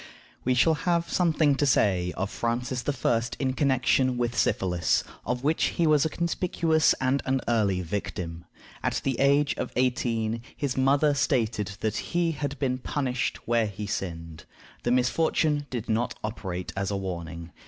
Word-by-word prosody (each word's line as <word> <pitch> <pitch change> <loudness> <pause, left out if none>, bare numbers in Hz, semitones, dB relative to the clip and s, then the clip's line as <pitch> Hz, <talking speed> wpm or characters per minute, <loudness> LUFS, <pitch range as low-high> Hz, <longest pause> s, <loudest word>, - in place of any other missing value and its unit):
We 125 0 +2
shall 160 +6 +4
have 170 +2 0
something 160 -4 +3
to 140 +2 +1
say 90 -8 +2
of 95 +2 -2
Francis 125 +2 -2 0.2
I. 115 -1 +4 0.2
in 130 -2 0
connection 130 -2 +2
with 120 0 -1
syphilis, 90 -6 +1 0.2
of 125 +1 -1
which 155 +3 +2
he 170 - 0
was 150 -2 +4
a - - +1
conspicuous 170 -1 +1
and 130 +1 +1
an 135 0 +2
early 100 -6 +2
victim. 85 -2 -4 0.4
At - - -1
the 135 -3 -1
age 140 +1 +3
of - - -3
eighteen 115 -3 0 0.2
his 140 -3 -1
mother 140 +3 +3
stated 110 -7 0
that 110 0 -1
he 170 -1 0
had 145 -1 -4
been 130 -2 -1
punished 130 -2 -2
where 115 -1 +2
he 105 +1 -6
sinned. 85 -5 -5 0.4
The - - -1
misfortune 145 +3 +1
did 120 -3 -4
not 115 +1 0
operate 95 -5 -4
as 95 0 -1
a 100 - -1
warning. 85 -3 -6
125 Hz, 160 wpm, -27 LUFS, 105-145 Hz, 0.4 s, shall